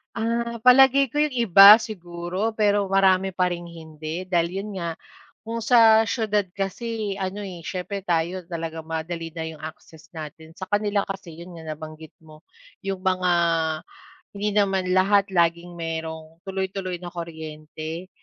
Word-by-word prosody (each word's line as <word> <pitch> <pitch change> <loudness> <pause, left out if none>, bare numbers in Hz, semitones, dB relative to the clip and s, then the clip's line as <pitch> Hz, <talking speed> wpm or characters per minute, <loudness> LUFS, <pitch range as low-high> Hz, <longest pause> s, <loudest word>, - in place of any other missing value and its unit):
Ah, 235 0 -2
palagay 265 +2 +6
ko 295 - -6
'yong 300 -2 +2
iba 205 -4 +9
siguro, 180 0 -4
pero 205 -2 +2
marami 190 0 +3
pa 180 0 +1
ring 175 0 -5
hindi 160 0 -7
dahil 175 +2 0
'yon 210 - -7
nga 170 -2 -3 0.5
kung 230 +1 -5
sa 225 -1 +5
siyudad 210 -3 0
kasi 205 +1 -3
ano, 195 +1 -4
eh, 180 -5 -8
siyempre 195 +1 -5
tayo 175 +1 -1
talagang 165 -2 -6
madali 165 0 -5
na 165 - -5
'yong 160 -1 -6
access 160 +1 -12
natin. 160 0 -9
Sa 185 +2 -8
kanila 205 0 +1
kasi 195 -3 -6
'yon 170 +2 -11
nga 160 -1 -6
nabanggit 155 0 -11
mo 155 +1 -17 0.4
'yong 195 -1 -3
mga 185 -1 +1 1.0
hindi 205 +1 -2
naman 195 -3 +2
lahat 200 +1 +4
laging 170 -1 0
merong 160 -1 -6
tuloy-tuloy 190 -1 -3
na 175 0 -9
kuryente, 160 0 -7
185 Hz, 150 wpm, -24 LUFS, 165-205 Hz, 1.0 s, iba